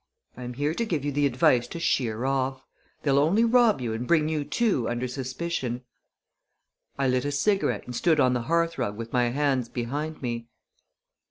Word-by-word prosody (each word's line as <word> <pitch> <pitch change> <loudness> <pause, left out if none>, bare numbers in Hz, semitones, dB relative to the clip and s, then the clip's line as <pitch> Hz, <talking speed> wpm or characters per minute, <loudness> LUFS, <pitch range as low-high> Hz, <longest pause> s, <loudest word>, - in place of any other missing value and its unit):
I 125 - -10
am 125 0 -6
here 145 +3 0
to 230 - -1
give 160 -10 -2
you 145 - 0
the 145 +1 +2
advice 120 -1 +3
to 170 - -7
sheer 120 -6 0
off! 135 -1 -1 0.4
They'll 140 -2 +3
only 175 +10 +3
rob 235 - +4
you 115 -3 -2
and 120 +2 -4
bring 155 -2 +3
you, 155 -2 -1
too, 190 - 0
under 120 +1 -2
suspicion." 130 -1 -3 1.1
I 135 -1 +1
lit 125 0 +1
a 145 - -2
cigarette 195 +8 +1
and 125 - -7
stood 160 +4 +2
on 130 -3 +4
the 125 - 0
hearthrug 165 -11 0
with 115 0 -7
my 120 -1 +3
hands 135 -2 0
behind 145 +6 -4
me. 120 -1 -3
135 Hz, 185 wpm, -26 LUFS, 125-155 Hz, 1.1 s, rob